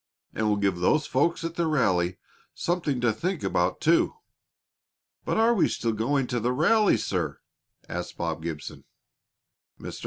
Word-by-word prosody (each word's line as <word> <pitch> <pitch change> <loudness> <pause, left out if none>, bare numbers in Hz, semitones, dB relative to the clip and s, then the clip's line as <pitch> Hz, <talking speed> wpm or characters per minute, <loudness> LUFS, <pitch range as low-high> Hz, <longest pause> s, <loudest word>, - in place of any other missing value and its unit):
And 110 - -1
we'll 105 -1 +2
give 100 -3 +1
those 150 - +2
folks 165 +7 +1
at 165 0 -3
the 170 -1 0
rally 90 - +1 0.4
something 165 -7 -1
to 120 -2 +2
think 180 - -3
about, 90 +1 0
too." 165 - +3 1.1
"But - - 0
are 225 +2 +4
we 205 - +3
still 115 -1 -1
going 130 +5 0
to 125 0 -2
have 115 - -3
the 125 +1 +1
rally, 205 - +4
sir?" - - -2 0.5
asked 90 0 -5
Bob 80 -2 -3
Gibson. 80 -3 -6 0.9
Mr. - - -7
125 Hz, 160 wpm, -26 LUFS, -, 1.1 s, are